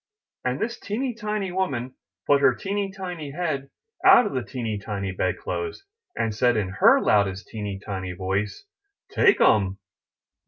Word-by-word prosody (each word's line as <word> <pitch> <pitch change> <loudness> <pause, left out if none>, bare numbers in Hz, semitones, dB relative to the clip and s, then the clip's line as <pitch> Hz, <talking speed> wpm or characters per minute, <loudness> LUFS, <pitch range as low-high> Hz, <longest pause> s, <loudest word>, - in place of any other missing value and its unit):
'^ - - +3
And 130 - -4
this 235 +2 -3
teeny 245 +5 -2
tiny 210 -4 -3
woman 135 -10 -2 0.3
put 140 -1 +4
her 130 - +5
teeny 200 +3 -2
tiny 180 -6 -6
head 145 -5 -2 0.3
out 375 -9 +8
of - - -3
the 130 - 0
teeny 115 -4 -4
tiny 100 -2 -4
bed 95 - -1
clothes, 420 -2 -4 0.3
and 110 - -1
said 120 +2 +2
in 100 -3 -1
her 95 - +5
loudest 100 -2 +1
teeny 105 -3 -4
tiny 95 -3 -5
voice: 95 - -3 0.5
"TAKE 390 - +4
'EM!" 95 -3 +3
130 Hz, 160 wpm, -25 LUFS, -, 0.5 s, out